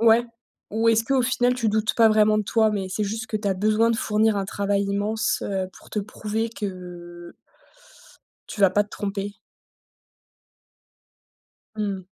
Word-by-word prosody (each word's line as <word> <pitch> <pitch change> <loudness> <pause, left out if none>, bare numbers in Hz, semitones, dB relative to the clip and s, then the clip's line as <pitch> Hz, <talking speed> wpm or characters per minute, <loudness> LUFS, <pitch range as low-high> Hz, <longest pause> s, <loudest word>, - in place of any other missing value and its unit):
Ouais? 230 +1 +5 0.5
Ou 225 +2 +1
est-ce 225 0 +4
qu'au 265 0 +2
final, 245 0 +2
tu 230 -3 0
doutes 215 0 +1
pas 225 -1 +6
vraiment 215 0 +4
de - - +1
toi, 220 +1 +2
mais 195 -2 -2
c'est 210 +3 -2
juste 220 +2 -4
que 215 - -2
tu 205 -1 -2
as 190 - +1
besoin 215 +4 +2
de 230 - +1
fournir 215 0 +2
un 195 - -1
travail 200 +1 0
immense, 205 +2 -1
heu, 190 -2 -2
pour - - -17
te - - -2
prouver 215 +2 -3
que 175 -5 -8 1.1
tu 205 - -5
vas 195 - +7
pas 205 +2 +2
te 205 - -21
tromper? 200 0 -4 2.4
Mmh. 200 -3 -3
210 Hz, 165 wpm, -24 LUFS, 200-220 Hz, 2.4 s, vas